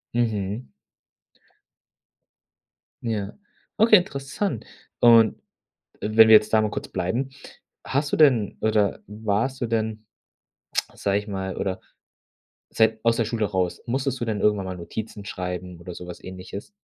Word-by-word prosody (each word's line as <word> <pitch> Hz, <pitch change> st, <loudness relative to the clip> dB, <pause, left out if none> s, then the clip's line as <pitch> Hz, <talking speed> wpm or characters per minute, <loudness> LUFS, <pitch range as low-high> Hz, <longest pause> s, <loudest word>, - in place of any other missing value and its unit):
Mhm. 110 Hz, -1 st, -1 dB, 2.4 s
Ja, 105 Hz, -4 st, -2 dB, 0.4 s
okay, 220 Hz, 0 st, +7 dB
interessant, 140 Hz, -, -3 dB, 0.3 s
und 115 Hz, -2 st, +6 dB, 0.6 s
wenn 110 Hz, +1 st, +6 dB
wir 110 Hz, -, +9 dB
jetzt 105 Hz, 0 st, +4 dB
da 110 Hz, -, +6 dB
mal 105 Hz, -, 0 dB
kurz -, -, -5 dB
bleiben, 95 Hz, +9 st, -2 dB, 0.5 s
hast 145 Hz, +2 st, -1 dB
du -, -, +2 dB
denn 125 Hz, -10 st, +4 dB
oder 105 Hz, -2 st, +1 dB
warst 110 Hz, +5 st, -1 dB
du -, -, +1 dB
denn, 110 Hz, -1 st, -2 dB, 0.9 s
sage 100 Hz, 0 st, 0 dB
ich 105 Hz, +1 st, -7 dB
mal 95 Hz, -1 st, -4 dB
oder 95 Hz, -1 st, -2 dB, 0.9 s
seit 110 Hz, 0 st, +2 dB
aus 115 Hz, 0 st, +3 dB
der 115 Hz, -, +1 dB
Schule 110 Hz, -1 st, -1 dB
raus, 95 Hz, -3 st, -2 dB
musstest 130 Hz, +1 st, -1 dB
du -, -, 0 dB
denn 110 Hz, -3 st, -2 dB
irgendwann 105 Hz, -2 st, +2 dB
mal 95 Hz, -1 st, -5 dB
Notizen 105 Hz, +4 st, -7 dB
schreiben 90 Hz, -2 st, -5 dB
oder 85 Hz, 0 st, -8 dB
so 90 Hz, -, -9 dB
was 90 Hz, -, -9 dB
Ähnliches? 95 Hz, +2 st, -8 dB
110 Hz, 140 wpm, -24 LUFS, 100-115 Hz, 2.4 s, wir